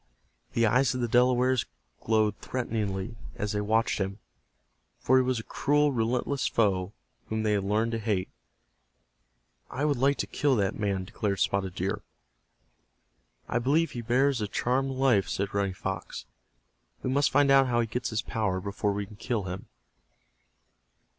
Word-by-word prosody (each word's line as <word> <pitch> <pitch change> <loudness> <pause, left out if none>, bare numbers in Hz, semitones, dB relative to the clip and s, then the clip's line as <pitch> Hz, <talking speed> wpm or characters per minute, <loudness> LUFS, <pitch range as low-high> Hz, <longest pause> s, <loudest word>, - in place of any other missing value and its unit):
The 115 - +3
eyes 125 +4 +3
of 125 - -2
the 120 - +1
Delawares 125 +1 +3 0.3
glowed 110 -1 +2
threateningly 110 -3 -3 0.2
as 105 -1 -2
they 105 - -1
watched 110 +2 +1
him, 95 0 -2 0.8
for 130 - +3
he - - +6
was 130 -1 0
a - - -6
cruel, 145 +4 +2
relentless 125 +3 0
foe 100 -3 +1 0.3
whom 110 0 -2
they 110 - +1
had 100 -2 +1
learned 110 +3 +1
to 115 - -2
hate. 105 -4 -1 1.4
"I 140 +4 -2
would 145 -3 +1
like 140 +2 +3
to - - -1
kill 145 -3 +1
that 100 -4 +1
man," 100 -3 -1
declared 100 +1 -2
Spotted 95 -2 0
Deer. 95 +1 -2 1.5
"I 120 - 0
believe 150 +7 +2
he 120 - -5
bears 125 +2 +2
a 105 - -1
charmed 130 +6 0
life," 130 -7 +2
said 100 +1 -2
Running 100 -2 0
Fox. 95 -1 -5 0.8
"We 130 - -1
must 140 +1 +3
find 140 -1 +4
out 135 -1 +6
how 120 -1 +1
he 120 - +2
gets 120 +2 -3
his 110 -1 -2
power 105 -5 -1
before 100 +2 -2
we 100 0 -3
can 100 +1 -14
kill 115 -1 -2
him." 95 0 -6
115 Hz, 165 wpm, -28 LUFS, 100-130 Hz, 1.5 s, he